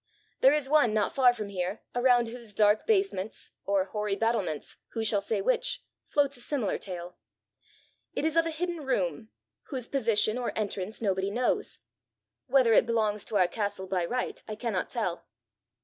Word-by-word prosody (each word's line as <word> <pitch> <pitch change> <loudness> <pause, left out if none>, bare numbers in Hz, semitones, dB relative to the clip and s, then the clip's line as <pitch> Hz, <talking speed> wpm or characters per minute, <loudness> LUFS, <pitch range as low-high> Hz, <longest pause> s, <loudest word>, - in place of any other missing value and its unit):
There 265 - +7
is 295 -2 +1
one 270 -7 +4
not 210 -2 +1
far 255 -2 +6
from 215 -4 -6
here, 185 +1 -3
around 245 -1 +3
whose 230 -3 -9
dark 210 +1 +3
basements 385 - 0 0.2
or 195 -1 +2
hoary 210 0 -2
battlements 200 -8 -1 0.2
who 225 -1 -2
shall 210 -2 +3
say 200 -1 -1
which? - - +1 0.2
floats 285 -1 +1
a - - -8
similar 245 -6 -1
tale. 180 -2 -7 1.0
It - - -1
is 320 0 +1
of 330 0 +4
a - - -1
hidden 340 0 -3
room, 190 - -1 0.4
whose 255 -5 -3
position 230 -3 +2
or 245 - -3
entrance 210 0 -3
nobody 190 -1 +1
knows. 240 +4 -1 0.7
Whether 255 -4 +4
it 225 - +5
belongs 215 -3 0
to - - -5
our 185 -2 +4
castle 205 0 -3
by 185 -2 -1
right 250 +7 -3
I 215 - -4
cannot 215 -4 -2
tell." 215 -8 -3
220 Hz, 170 wpm, -29 LUFS, 200-255 Hz, 1.0 s, There